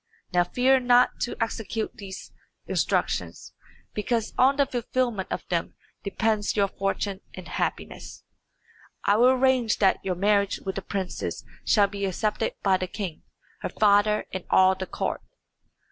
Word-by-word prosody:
Now 175 0 +4
fear 255 +8 +3
not 245 0 +4
to 240 - -2
execute 225 -1 -3
these 190 -2 -9 0.3
instructions, - - -1 0.4
because 225 +1 -1
on 265 +2 +4
the 280 0 +3
fulfilment 240 -4 -2
of - - -3
them 170 -2 -1 0.3
depends 215 +1 0
your 200 -2 +2
fortune 195 0 -2
and - - -9
happiness. - - -4 0.8
I 205 - +3
will 245 +3 +6
arrange 255 -3 +3
that 195 -2 +2
your 185 -2 -1
marriage 200 +1 +2
with 190 - -3
the 195 - -4
princess 190 -2 -4 0.2
shall 205 -2 +4
be 200 0 -3
accepted 210 +3 -1
by 190 -2 +4
the 185 - -3
king, 185 -5 -5 0.4
her - - -4
father, 210 0 +3
and 185 -2 -4
all 190 0 +5
the 190 0 -5
court." - - -3
205 Hz, 145 wpm, -26 LUFS, 190-235 Hz, 0.8 s, will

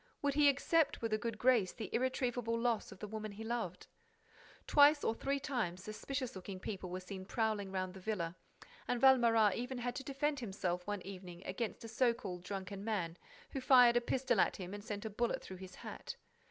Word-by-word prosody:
Would 285 -1 +2
he 290 0 +6
accept 280 +1 +2
with 225 -1 0
a 215 - +2
good 230 0 -3
grace 235 -6 +3
the 220 -5 -7
irretrievable 245 -2 0
loss 230 -2 0
of - - -10
the 210 - -6
woman 215 0 -5
he 215 +2 -7
loved? 225 -6 -3 0.8
Twice 290 0 +6
or - - +2
three 275 +4 -1
times, 240 - -2
suspicious 255 +4 -4
looking 190 0 -7
people 190 -2 -5
were 180 +1 -3
seen 185 0 -7
prowling 210 -1 -1
round 185 -1 -2
the 190 - -9
villa; 180 -4 -2 0.5
and 245 - 0
Valméras 235 -6 +6
even 250 +2 -3
had 245 0 -2
to 270 - -5
defend 285 +1 -1
himself 190 -5 -3
one 205 -3 -2
evening 185 -2 -9
against 215 +5 -3
a - - -6
so 235 +1 +2
called 180 -5 -6
drunken 195 +1 -5
man, 190 -7 -1 0.4
who 270 - -3
fired 250 -2 +7
a 240 - +4
pistol 245 -2 +1
at - - +3
him 185 0 -6
and 205 0 -6
sent 205 0 -5
a - - -2
bullet 235 +3 0
through 190 - -8
his 185 -1 -10
hat. - - -7
220 Hz, 205 wpm, -35 LUFS, 190-250 Hz, 0.8 s, fired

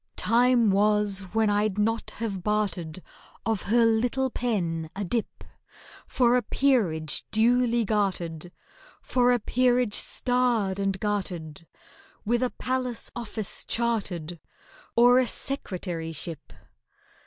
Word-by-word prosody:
Time 240 -2 +3
was 205 -1 +2
when 220 -1 +3
I'd 205 -1 +1
not 225 +2 0
have 205 -5 -3
bartered 185 -5 -2 0.4
Of 220 -3 0
her 235 +1 +4
little 245 +4 +1
pen 170 -11 -2
a 200 - -3
dip 230 +4 -3 0.6
For 245 -1 +3
a 250 - +3
peerage 205 - +1
duly 235 +1 +2
gartered— 180 -5 -2 0.5
For 250 -1 +2
a 245 - +4
peerage 245 0 +1
starred 240 -7 +1
and 195 -1 -1
gartered— 175 -7 -4 0.6
With 240 +3 +1
a 255 - +1
palace 255 -2 -3
office 220 -3 -3
chartered, 190 -8 -2 0.6
Or 245 +2 +6
a 255 - +1
Secretaryship. 170 - -5
215 Hz, 110 wpm, -26 LUFS, 190-240 Hz, 0.6 s, Or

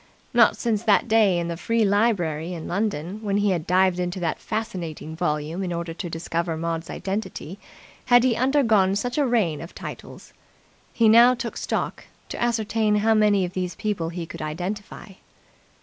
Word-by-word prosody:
Not - - +5
since 225 -4 0
that 220 +1 +3
day 215 -5 +4
in 170 -1 -2
the 170 - -3
free 230 +5 +1
library 180 -6 +1
in 165 - -7
London, 195 -1 -2
when 200 -2 0
he 205 -1 +2
had 170 -4 -2
dived 185 0 +3
into 180 +1 -2
that 165 -3 -2
fascinating 170 -7 -5
volume 155 +1 -2
in 185 -2 -3
order 170 -1 -4
to 175 +1 -6
discover 165 0 -3
Maud's 165 0 -3
identity, 195 -2 -5 0.5
had 245 -1 +5
he 255 -3 +3
undergone 230 -7 +3
such 245 +7 -2
a 285 - +2
rain 200 -11 +1
of 170 - -10
titles. - - -9 0.6
He 230 - +3
now 235 +3 +7
took 235 -1 -5
stock, - - -3 0.2
to - - -6
ascertain 220 -2 +1
how 220 +2 +3
many 210 -3 +3
of 175 - -7
these 180 -1 -3
people 195 -6 -2
he 170 0 -5
could - - -9
identify. 180 +9 -5
195 Hz, 175 wpm, -24 LUFS, 170-220 Hz, 0.6 s, now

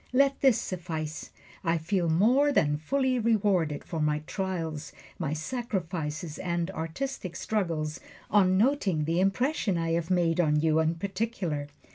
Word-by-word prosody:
Let 275 +1 +3
this 265 -5 +5
suffice: 165 -4 -4 0.3
I 165 -1 +2
feel 170 +1 0
more 245 - +4
than 150 - +3
fully 255 - 0
rewarded 200 -9 +1
for 165 - -5
my 150 0 +1
trials, 165 -6 -3 0.3
my 155 -4 -1
sacrifices 165 -5 -3
and 175 0 -1
artistic 185 +4 -4
struggles, 165 -7 -2 0.3
on 185 -2 +4
noting 205 - +2
the 165 +3 +1
impression 195 - +1
I 165 0 -1
have 165 0 0
made 175 -2 +2
on 150 -3 +3
you 160 0 +3
in 160 +1 +2
particular. 185 -5 -2
175 Hz, 140 wpm, -28 LUFS, 160-210 Hz, 0.3 s, this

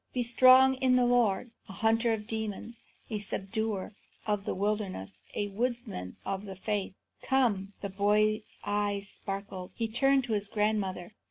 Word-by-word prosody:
Be 250 - 0
strong 255 +2 +6
in 255 -1 +3
the 250 -1 +4
Lord, 240 -2 +2 0.2
a - - -7
hunter 225 +2 +2
of 220 -1 0
the - - -15
demons, 220 +1 -4 0.3
a 215 - -1
subduer 205 +1 -2 0.3
of 210 -2 -1
the - - -2
wilderness, 190 - -2
a 205 0 -1
woodsman 230 - -3
of 195 +1 -3
the 195 -1 -7
faith. 200 0 -3 0.3
Come!" 215 -7 +1
The 200 - -3
boy's 210 +2 +1
eyes 205 -1 -1
sparkled. 195 -2 -6
He 230 - -1
turned 270 +4 +3
to 235 -3 -2
his 205 -1 0
grandmother. 210 -3 -1
210 Hz, 160 wpm, -30 LUFS, 195-235 Hz, 0.3 s, strong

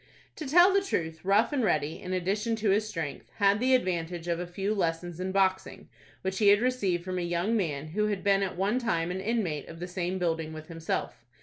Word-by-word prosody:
To 310 - -5
tell 350 +7 +6
the 395 - +4
truth, 165 - -3
Rough 200 +8 +3
and 265 -4 +1
Ready, 155 -5 0
in 185 -2 -6
addition 200 +5 0
to 215 -2 +1
his 215 +2 +1
strength, 160 -8 -5
had 200 0 +3
the 260 +2 +4
advantage 175 -6 -2
of 170 -1 0
a 180 - -4
few 195 +4 -2
lessons 170 -3 -2
in 185 +1 -2
boxing, 190 -1 0 0.3
which 190 0 -2
he 210 - +4
had 205 0 +7
received 210 -8 0
from 185 -1 -2
a - - -2
young 175 +6 0
man 155 -7 -2
who 210 +6 0
had 205 -2 -2
been 200 -1 +3
at 190 -3 -2
one 200 +6 +1
time 180 -8 -1
an 190 +1 -3
inmate 195 -8 -1
of 165 - -10
the 175 - -4
same 180 0 -2
building 165 -3 -1
with 155 0 -9
himself. 165 -7 -4
190 Hz, 225 wpm, -28 LUFS, 170-210 Hz, 0.3 s, had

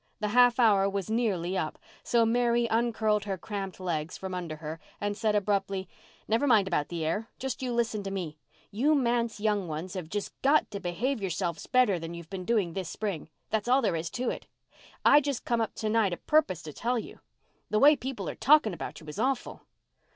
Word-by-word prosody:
The 210 - -1
half 245 +2 +5
hour 200 -4 +5
was 200 +1 -3
nearly 195 -6 0
up, 160 -5 -2 0.3
so 235 -1 +3
Mary 240 +1 +2
uncurled 220 -2 +1
her 195 -2 -2
cramped 195 0 -5
legs 165 -3 -3
from 190 -1 -6
under 175 -4 -4
her 155 +1 -7 0.2
and 205 0 -1
said 215 0 +1
abruptly, 195 -2 0 0.4
"Never 230 +6 +2
mind 215 -6 +5
about 150 -6 0
the 170 -2 -3
air. 205 +8 -2
Just 265 -1 -4
you 255 -1 -2
listen 230 -3 0
to 195 - -5
me. 170 -6 -5 0.3
You 280 +9 +3
manse 235 -4 +1
young 205 -3 0
ones 160 +4 -5
have 180 -4 -5
just 205 +2 -3
got 285 -1 +3
to 200 - -4
behave 205 +8 -2
yourselves 175 -3 -2
better 250 -8 +3
than 165 +1 -6
you've 170 0 -10
been 185 -2 -5
doing 205 -7 +1
this 185 -3 -4
spring—that's 205 +2 -4
all 260 +2 +4
there 195 -6 +1
is 160 0 -3
to 245 +7 -2
it. - - -7 0.6
I 295 - +8
just 280 -3 -3
come 235 -1 +1
up 220 - -2
to 220 - -3
night 215 -4 +2
a - - -3
purpose 285 - +1
to 155 -1 -8
tell 245 - -1
you 225 - -6
so. - - -27 0.5
The 215 - +2
way 295 +4 +8
people 265 -1 -5
are - - -3
talking 285 -8 +4
about 170 - -7
you - - -13
is 150 +7 -7
awful." 260 +1 -2
210 Hz, 210 wpm, -29 LUFS, 180-235 Hz, 0.6 s, I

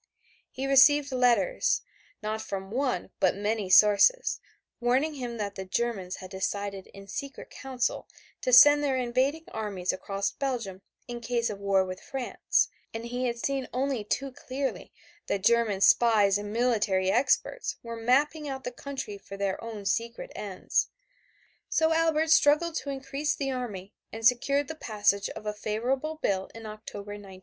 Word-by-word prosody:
He 265 - -5
received 275 +1 +5
letters, 255 - +2 0.4
not 215 +1 -2
from 195 -1 -6
one 250 -7 -1
but 185 - +3
from 200 - -8
many 210 -2 -1
sources, 210 - +5 0.4
warning 255 +6 +1
him 245 -4 -5
that 205 -2 -3
the 190 - -6
Germans 190 -2 -2
had 185 0 -10
decided 195 0 -3
in 195 0 -13
secret 275 +6 -7
council 260 -2 -3 0.3
to 255 - -1
send 290 +4 +8
their 270 -2 +1
invading 260 +5 0
armies 200 -5 -2
across 195 +1 -3
Belgium 235 -9 -4 0.3
in 240 -1 -6
case 235 -1 -1
of 200 - -7
war 195 -1 +2
with 185 0 -6
France, 265 -2 0 0.2
and 225 +1 -6
he 245 +2 -2
had 235 0 -2
seen 270 +2 -2
only 260 -2 -1
too 270 +6 -2
clearly 265 +2 -4 0.4
that 195 - -1
German 230 -4 +3
spies 205 -3 +5
and 205 0 -6
military 210 -5 +1
experts 280 - +1
were 230 0 -6
mapping 285 +6 +1
out 265 -1 -5
the 250 - -4
country 250 -6 -6
for 195 - -10
their 195 0 -2
own 220 -3 -7
secret 235 +3 -2
ends. 195 -3 -1 0.8
So 320 0 +2
Albert 320 -1 +2
struggled 305 +3 +4
to 280 - -5
increase 275 +2 -2
the 275 -1 -2
army 210 -7 -5 0.2
and 225 0 -6
secured 275 +4 +3
the 320 - -5
passage 205 -8 0
of - - -9
a 210 - -2
favorable 250 +9 -2
bill 190 -10 -1
in 225 0 -9
October, 215 -1 -8
1913. 200 -2 -10
235 Hz, 160 wpm, -28 LUFS, 200-270 Hz, 0.8 s, send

